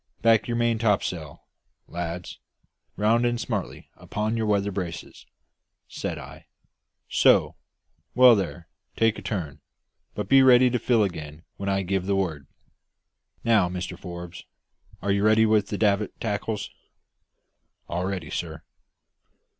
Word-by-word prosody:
"Back 115 -1 +4
your 120 -1 -1
main 120 -1 +1
topsail, 90 -8 -1 0.4
lads; 85 0 -6 0.6
round 110 +3 +3
in 120 0 +1
smartly 115 - -5
upon 110 +2 -3
your 110 -1 -1
weather 100 -1 +1
braces," 85 -4 -6 0.6
said - - -5
I. - - -11 0.6
"So! - - +3 0.6
well 125 -1 +8
there; 90 -4 -4 0.3
take 115 -1 +2
a - - -10
turn; 80 -9 -4 0.6
but - - -3
be 135 0 +6
ready 125 -1 +6
to 125 - 0
fill 115 -1 +2
again 80 -4 -5
when 100 0 -3
I 95 0 0
give 95 0 -2
the 100 - +1
word. 80 -8 -2 1.0
Now, 110 -6 +3
Mr 90 0 -5
Forbes, 85 0 -9 0.6
are 100 - +1
you 100 0 +1
ready 110 +1 +5
with 110 -2 +2
the 105 - -4
davit 105 -1 0
tackles?" 105 -1 -3 1.2
"All 90 +1 -2
ready, 90 -6 -4
sir." 80 -2 -5
100 Hz, 135 wpm, -25 LUFS, 90-110 Hz, 1.2 s, well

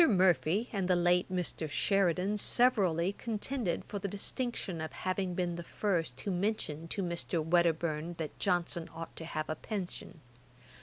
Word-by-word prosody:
Murphy 190 +1 +3
and 195 -3 0
the 185 - +4
late 175 +1 +3
Mr. 175 -3 -1
Sheridan 195 +4 +2
severally 195 -8 +3
contended 225 -2 -2
for 205 - -4
the 200 - -2
distinction 205 - -2
of 160 - -4
having 185 -1 -2
been 175 -1 -1
the 170 - -5
first 165 - -1
who 200 - -2
mentioned 175 -5 -1
to 195 - -1
Mr. 170 -1 -1
Wedderburne 170 -1 +2
that 160 -2 -5
Johnson 175 -1 0
ought 165 0 -7
to 165 - -6
have 155 -1 -3
a - - -1
pension. 180 -4 -5
180 Hz, 155 wpm, -32 LUFS, 165-200 Hz, -, the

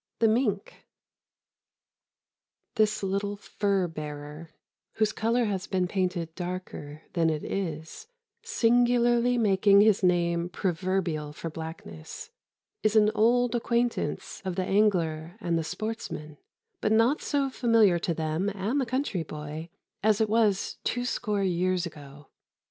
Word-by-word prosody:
V 230 - +3
THE 220 - +5
MINK 215 -5 -2 1.9
This 215 -3 +1
little 200 +1 -1
fur 200 -2 0
bearer, 150 0 -7 0.4
whose 215 -1 +1
color 230 +2 +1
has 195 -3 -2
been 185 -2 0
painted 180 -3 -2
darker 175 -4 -6
than 165 -2 +2
it 155 -1 -2
is, 165 - -4 0.3
singularly 245 - +3
making 200 -2 +5
his 210 -1 +4
name 175 -1 +2
proverbial 175 -4 -1
for 165 +1 -6
blackness, 160 - -8 0.5
is 215 0 +1
an 215 -1 +5
old 240 +2 +3
acquaintance 235 0 -1
of 185 -2 -3
the 185 0 -1
angler 175 -4 +1
and 170 -6 -1
the 165 - 0
sportsman, 180 -6 -5 0.4
but 215 - 0
not 230 +6 +3
so 280 -2 0
familiar 225 -8 +4
to 170 0 -1
them 160 +5 -1
and 215 +9 0
the 255 - -2
country 255 -7 -1
boy 155 +1 -7 0.3
as 215 0 +3
it 220 -1 +2
was 215 -3 +1
twoscore 245 -4 -1
years 185 0 +1
ago. 145 -3 -11
195 Hz, 130 wpm, -27 LUFS, 165-225 Hz, 1.9 s, THE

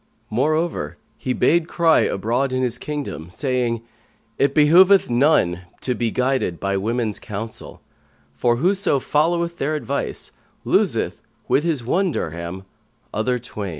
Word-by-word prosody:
Moreover, 135 - 0 0.2
he 130 - -4
bade 165 +6 +2
cry 165 -2 +3
abroad 120 +7 0
in 130 0 0
his 125 -1 -1
kingdom, 140 - -5
saying, 120 +1 -1 0.6
"It 140 0 +2
behoveth 175 +3 +6
none 120 - +3 0.2
to 125 - -1
be 120 -1 -1
guided 125 -9 0
by 100 0 -1
women's 110 +1 -1
counsel; 110 +2 -7 0.5
for 120 +12 +1
whoso 185 +3 +2
followeth 170 +5 0
their 155 +3 0
advice, 140 -2 -3 0.3
loseth, - - +1 0.3
with 145 - +2
his 160 -7 -1
one 180 +9 +1
dirham, 85 - -5 0.5
other 125 +4 0
twain." 110 -4 -6
125 Hz, 130 wpm, -21 LUFS, 110-155 Hz, 0.6 s, behoveth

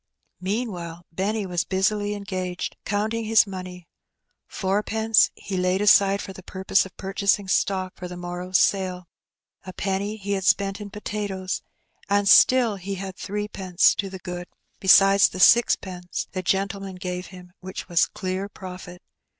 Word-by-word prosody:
Meanwhile 180 -4 -4
Benny 200 +4 -2
was 175 -2 -1
busily 205 +2 0
engaged 185 -3 -4
counting 220 +2 -1
his 225 0 +5
money. 185 -3 -8 0.6
Fourpence 215 +3 +2
he 195 - -6
laid 185 +1 +1
aside 200 -1 +4
for 195 - -8
the 190 - -11
purpose 190 +1 0
of - - -22
purchasing 195 +1 0
stock 190 -1 0
for 180 - -6
the 180 0 -8
morrow's 175 +1 -2
sale, 185 -2 +1 0.6
a 185 - -8
penny 195 +3 -2
he 200 -1 -5
had 195 -1 -1
spent 195 +2 +1
in 205 - -7
potatoes, 200 -2 -4 0.5
and 200 0 +2
still 235 +1 +6
he 195 +1 -5
had 190 0 -6
threepence 195 -3 +1
to 195 - -3
the 190 - -7
good, 180 -1 -7 0.3
besides 195 +1 +6
the 185 - -8
sixpence 185 -4 +3
the 185 - -3
gentleman 195 +1 -2
gave 180 -1 -5
him, 180 -1 -13
which 185 +1 -7
was 170 -2 +3
clear 190 +2 -4
profit. 180 -2 -10
190 Hz, 150 wpm, -24 LUFS, 185-205 Hz, 0.6 s, still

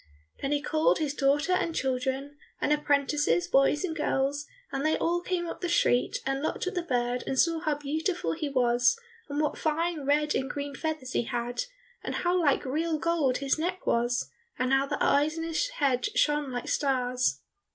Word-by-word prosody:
Then 275 - -1
he 290 0 0
called 310 +1 +2
his 300 -3 -1
daughter 290 +4 +2
and 335 -3 0
children, 265 +2 -1 0.2
and 300 - +2
apprentices, 285 - +1
boys 275 - +3
and 330 -4 -2
girls, 290 -1 0 0.2
and 275 0 -2
they 310 0 +2
all 345 +1 0
came 355 -1 -2
up - - -6
the 355 - -1
street 245 -7 +2
and 270 0 -1
looked 315 - -2
at 370 - -2
the 360 - -1
bird 245 -5 -1
and 265 - -1
saw 330 +3 +3
how 310 -2 0
beautiful 315 +5 -2
he 315 -3 -3
was, 245 - +3 0.3
and 285 +1 -2
what 300 - 0
fine 325 +1 0
red 300 +1 +2
and 265 - -1
green 285 -1 -4
feathers 300 -3 -4
he - - +1
had, 245 - -2 0.4
and - - -3
how 355 +1 +1
like 285 -4 +2
real 315 +4 0
gold 310 -6 +1
his 275 +2 0
neck 360 +3 -2
was, 240 +1 0 0.3
and 255 +1 +1
how 270 +1 +3
the - - -2
eyes 295 +3 +3
in 325 - -2
his 330 +9 0
head 275 - +1
shone 295 -2 +2
like 245 -1 -4
stars. 255 -3 +1
290 Hz, 195 wpm, -28 LUFS, 265-320 Hz, 0.4 s, boys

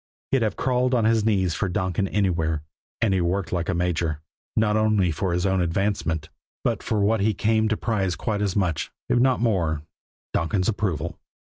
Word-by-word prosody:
He'd 135 - +3
have 110 -3 0
crawled 125 0 +1
on 115 -3 +2
his 110 -1 +3
knees 95 -6 +2
for 100 - -1
Donkin 95 +2 0
anywhere, 80 -7 0 0.4
and 110 -4 +3
he 95 - +2
worked 90 +2 -1
like 90 +1 -1
a 95 - +1
major 85 -3 0 0.4
not 110 -1 +2
only 110 -5 +3
for 90 +4 -1
his 90 +2 0
own 95 -1 +2
advancement, 85 -3 -1 0.3
but - - 0
for 105 -2 0
what 110 +2 +3
he 105 0 +2
came 110 +2 +2
to 110 - 0
prize 95 -6 0
quite 105 +1 -2
as 100 -3 0
much, 90 -6 0 0.2
if 120 - +3
not 130 -1 +3
more, 85 -10 +1 0.5
Donkin's 90 +3 0
approval. 100 -7 -1
100 Hz, 190 wpm, -24 LUFS, 90-110 Hz, 0.5 s, He'd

